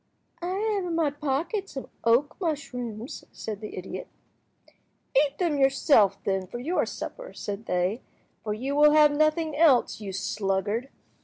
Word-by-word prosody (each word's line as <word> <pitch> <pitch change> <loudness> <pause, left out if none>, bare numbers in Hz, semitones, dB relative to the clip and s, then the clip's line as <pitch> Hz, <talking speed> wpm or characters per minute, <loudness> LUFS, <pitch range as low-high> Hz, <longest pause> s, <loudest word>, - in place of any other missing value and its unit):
"I 360 +2 -2 0.2
have 395 -3 -1
in 340 -2 -2
my 320 -3 +2
pocket 300 +8 -2
some 270 - -7 0.2
oak 235 +5 +3
mushrooms," 250 - -4
said 215 -2 -6
the 215 - -7
idiot. 190 - -6 1.1
"Eat 280 +1 +3
them 330 -6 0
yourself, 270 - +4
then, 190 -1 -1
for 240 - -6
your 305 +9 0
supper," - - -7
said 205 +2 -6
they, 180 +6 0 0.4
"for 215 - -3
you 265 +6 -3
will 295 +1 +6
have 300 -1 +7
nothing 310 +1 +1
else, 290 -8 +4
you 200 -2 -5
sluggard. 200 +5 -1
275 Hz, 150 wpm, -27 LUFS, 215-310 Hz, 1.1 s, have